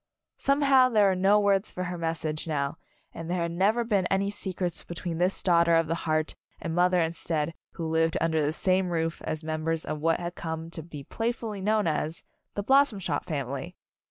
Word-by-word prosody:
Somehow 275 -2 +4
there 210 -4 +4
were 190 - +1
no 195 +3 +4
words 200 0 +2
for 185 - -4
her 180 0 -3
message 160 -1 -2
now, 145 0 -2 0.3
and 165 0 -7
there 175 -1 0
had 170 - -2
never 205 +7 +2
been 200 -6 +1
any 195 +2 +1
secrets 185 -3 -2
between 170 -1 -5
this 180 +2 +1
daughter 170 -2 +4
of 165 0 +3
the 160 - -1 0.2
heart 155 0 +1 0.3
and 165 - -4
mother 180 +1 +3
instead 165 -1 -1 0.2
who 170 - -6
had 160 - +3
lived 165 0 +1
under 160 -1 +1
the 145 - +1
same 185 +3 +1
roof 165 -1 -1
as 155 0 -3
members 160 +1 -2
of 155 - -3
what 165 +1 +2
had 175 0 -4
come 160 -1 -5
to 165 - -4
be 150 -3 -9
playfully 225 - -3
known 215 +2 +2
as 160 0 -1 0.3
"The 205 - -2
Blossom 270 -1 +4
Shop 165 -6 -2
Family." 140 +3 -4
170 Hz, 200 wpm, -27 LUFS, 160-195 Hz, 0.3 s, Somehow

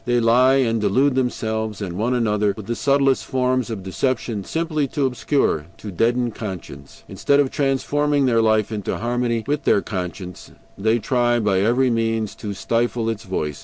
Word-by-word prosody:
They 120 +1 +1
lie, 125 +3 +4
and 115 -4 +1
delude 130 +7 +2
themselves, 110 -4 -2
and 95 -4 -4
one 115 +7 0
another, 105 -4 +1
with 110 - -8
the 120 - -2
subtlest 140 0 +2
forms 130 -1 0
of 105 -4 -5
deception, 115 +1 -2
simply 155 - -1
to 140 +1 -1
obscure, 125 - 0
to 105 - -8
deaden 120 +6 +1
conscience. 90 -10 -8
Instead 140 0 +1
of 140 -2 +2
transforming 145 +1 +1
their 115 -3 +3
life 110 -1 +2
into 105 -3 -3
harmony 120 -1 -1
with 145 +2 -1
their 100 - +3
conscience, 90 -2 -6 0.2
they 110 +3 +1
try 120 0 +1
by 100 -4 +1
every 120 +5 +2
means 115 -2 -1
to 100 -2 -5
stifle 115 +3 0
its 110 0 -7
voice. 75 -6 -3
115 Hz, 170 wpm, -21 LUFS, 105-130 Hz, 0.2 s, lie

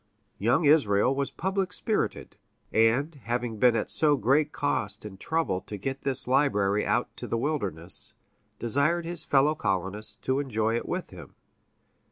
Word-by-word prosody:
Young 120 - +2
Israel 130 -6 +4
was 140 0 -2
public 190 +1 -2
spirited, - - -2 0.4
and, 120 +8 +2
having 120 -2 -2
been 125 0 +5
at 110 - -1
so 150 -2 +3
great 140 +6 +2
cost 105 -7 -2
and 95 -3 -9
trouble 160 - -1
to 105 - -8
get 135 +7 -4
this 135 -2 -1
library 105 -7 +2
out - - 0
to - - -6
the 115 - -1
wilderness, 100 - +1 0.4
desired 140 +8 +1
his 170 -2 +1
fellow 145 +2 +3
colonists 105 - -3
to 130 +1 0
enjoy 115 -5 -1
it 120 - -4
with 180 0 -4
him. 85 -7 -12
125 Hz, 155 wpm, -27 LUFS, 105-145 Hz, 0.4 s, been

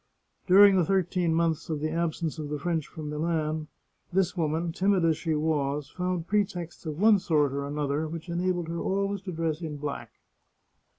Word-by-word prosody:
During 195 +1 +8
the 180 - +4
thirteen 180 -1 +1
months 165 -1 0
of 155 -2 -1
the 155 +1 -2
absence 165 -1 -2
of 150 -1 -5
the 150 - -2
French 160 0 -2
from 150 -2 -7
Milan, 155 0 -1 0.4
this 190 0 +1
woman, 165 0 -1
timid 190 0 +2
as 160 -1 +3
she 160 0 -1
was, 150 -2 -1
found 180 -2 -2
pretexts 180 -4 -2
of 155 0 -4
one 210 0 +6
sort 155 -7 +1
or 140 0 -3
another 145 +1 -1
which 165 +2 -7
enabled 175 0 -1
her 170 0 -3
always 200 0 -1
to 190 -1 -6
dress 165 -1 -2
in 155 -3 -5
black. 145 -1 -5
165 Hz, 180 wpm, -28 LUFS, 155-180 Hz, 0.4 s, During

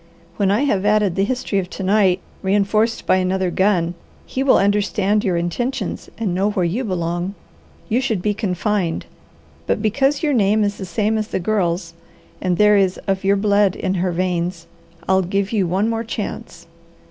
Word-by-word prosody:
When 200 -2 +2
I 210 +7 +2
have 205 -9 +1
added 210 -2 +2
the 195 - +2
history 220 -3 -1
of 180 -1 -4
to 195 - -6
night, 190 -2 +3 0.2
reinforced 205 +3 +1
by 185 - +3
another 185 0 0
gun, 180 -3 +1 0.3
he 260 - -3
will 270 -1 +5
understand 205 +1 +1
your 185 -5 +1
intentions 215 +6 -3
and 215 -6 -1
know 195 +3 +1
where 190 -4 0
you 205 +10 -1
belong. 175 -1 -2 0.5
You 240 +2 +1
should 225 -6 -1
be 210 +3 0
confined, 195 -3 -1 0.6
but - - +1
because 270 - +1
your 295 -2 +2
name 215 -2 +3
is 205 0 -1
the 190 - -5
same 215 +5 0
as 215 - -3
the - - -2
Girl's, 175 -3 -1 0.5
and 180 -2 0
there 210 +1 +5
is 190 -2 +2
of 195 -1 -1
your 195 +1 +3
blood 200 -1 +2
in 190 - -2
her 185 -1 0
veins, 175 -1 -2 0.4
I'll 190 0 +4
give 195 +2 -1
you 200 -5 +1
one 190 +5 +1
more 225 0 -1
chance. 230 - -6
195 Hz, 180 wpm, -20 LUFS, 185-215 Hz, 0.6 s, will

